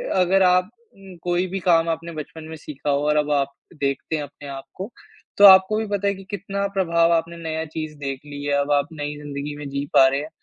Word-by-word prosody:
अगर 190 +1 +4
आप 180 +1 +4 0.3
उम, 195 -2 -13
कोई 175 +1 0
भी 195 +2 -4
काम 165 -1 +4
आपने 165 +1 -3
बचपन 155 +1 -8
में 160 - -6
सीखा 150 -1 -6
हो 140 +1 +1
और 150 - +3
अब 150 0 +1
आप 140 -1 +1 0.3
देखते 140 +3 -1
हैं 150 - -2
अपने 145 0 -11
आप 135 -1 -7
को, 195 +6 -6 0.5
तो 205 - +8
आपको 190 +2 +8
भी 220 - -1
पता 200 -1 -1
है 200 - +2
कि 195 - -11
कितना 200 0 -2
प्रभाव 170 -3 +3
आपने 170 +1 -1
नया 160 -1 -3
चीज़ 155 0 -6
देख 135 -2 -4
ली 145 -1 -8
है। 145 - -1
अब 140 +1 -2
आप 145 0 +3
नई 145 -1 -4
जिंदगी 145 0 -6
में 145 -1 -6
जी 140 +1 -3
पा 135 - +7
रहे 135 +1 0
हैं, 150 +2 -6
160 Hz, 240 wpm, -23 LUFS, 145-185 Hz, 0.5 s, तो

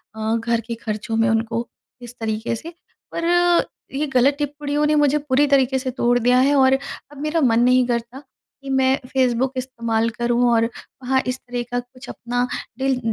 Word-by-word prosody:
अ, 220 +1 -1
घर 230 0 0
के 235 - -3
खर्चों 220 0 -4
में 225 0 +3
उनको, 225 +1 -1 0.3
इस 240 0 -10
तरीके 220 +1 -2
से। 330 +9 -9 0.4
पर 335 - -2 0.7
ये 300 +1 0
गलत 260 +3 +4
टिप्पणियों 290 0 -1
ने 305 - +2
मुझे 295 -1 +3
पूरी 290 0 +2
तरीके 265 -1 +3
से 260 0 -3
तोड़ 245 -1 +2
दिया 245 +1 +3
है 275 +3 +3
और 265 -1 +5
अब 275 +1 -5
मेरा 305 +2 0
मन 235 -4 +3
नहीं 250 +1 +4
करता, 235 +1 -3 0.4
कि 275 - -8
मैं 265 0 +3
फेसबुक 255 0 +1
इस्तेमाल 230 -3 -1
करूँ 240 +2 +1
और 230 0 +3 0.4
वहाँ 260 +1 +2
इस 255 +1 -2
तरह 245 0 -5
का 245 - 0
कुछ 250 +1 -12
अपना, 245 +1 -2 0.3
दिल 265 -1 +1
250 Hz, 185 wpm, -21 LUFS, 235-270 Hz, 0.7 s, और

